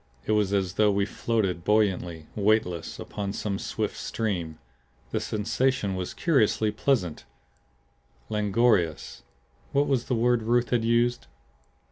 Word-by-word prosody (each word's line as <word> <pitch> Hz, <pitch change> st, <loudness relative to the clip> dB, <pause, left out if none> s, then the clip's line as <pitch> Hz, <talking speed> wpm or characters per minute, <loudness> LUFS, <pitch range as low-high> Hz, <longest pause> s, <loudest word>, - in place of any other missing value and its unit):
It -, -, -1 dB
was 105 Hz, -2 st, +2 dB
as 95 Hz, -3 st, 0 dB
though 105 Hz, +1 st, +3 dB
we 100 Hz, 0 st, +1 dB
floated 100 Hz, -5 st, -1 dB
buoyantly, 90 Hz, -6 st, +1 dB
weightless, 100 Hz, -6 st, +1 dB
upon 100 Hz, -1 st, -5 dB
some 100 Hz, -2 st, -3 dB
swift -, -, -3 dB
stream. 90 Hz, -8 st, -3 dB, 0.5 s
The -, -, 0 dB
sensation 110 Hz, 0 st, 0 dB
was 90 Hz, -1 st, -4 dB
curiously 110 Hz, -8 st, +2 dB
pleasant, 105 Hz, -, 0 dB, 1.0 s
languorous 105 Hz, -5 st, +1 dB, 0.5 s
what 140 Hz, +1 st, +3 dB
was 130 Hz, -4 st, 0 dB
that 125 Hz, -, 0 dB
word 120 Hz, +1 st, +2 dB
Ruth 120 Hz, +2 st, +1 dB
had 120 Hz, -2 st, +2 dB
used? 120 Hz, +1 st, +1 dB
105 Hz, 125 wpm, -26 LUFS, 95-115 Hz, 1.0 s, though